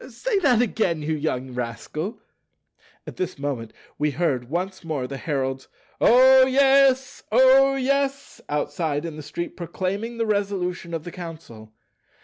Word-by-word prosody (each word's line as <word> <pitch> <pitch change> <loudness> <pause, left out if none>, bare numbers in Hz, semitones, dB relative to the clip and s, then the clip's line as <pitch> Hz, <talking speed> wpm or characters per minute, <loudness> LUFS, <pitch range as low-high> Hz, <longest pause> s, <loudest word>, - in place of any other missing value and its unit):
Say 405 - -1
that 250 - +3
again, 185 -9 -1
you 160 +2 -1
young 130 -4 -3
rascal." 140 - -5 0.9
At - - -9
this 185 - -3
moment 140 -6 -4 0.3
we 150 +1 +2
heard 135 -5 -1
once 185 +4 -3
more 155 -6 -3
the 135 +2 -6
herald's 135 -2 -3 0.3
"O 260 +2 +7
yes! 270 0 +3
O 265 +3 +6
yes!" 275 +1 -1
outside 150 +1 -2
in 165 -2 -6
the 155 - -7
street 160 +4 -6
proclaiming 195 +6 -4
the 230 - 0
Resolution 190 -5 -2
of 160 - -5
the 175 - -8
Council. 160 -12 -10
175 Hz, 140 wpm, -23 LUFS, -, 0.9 s, O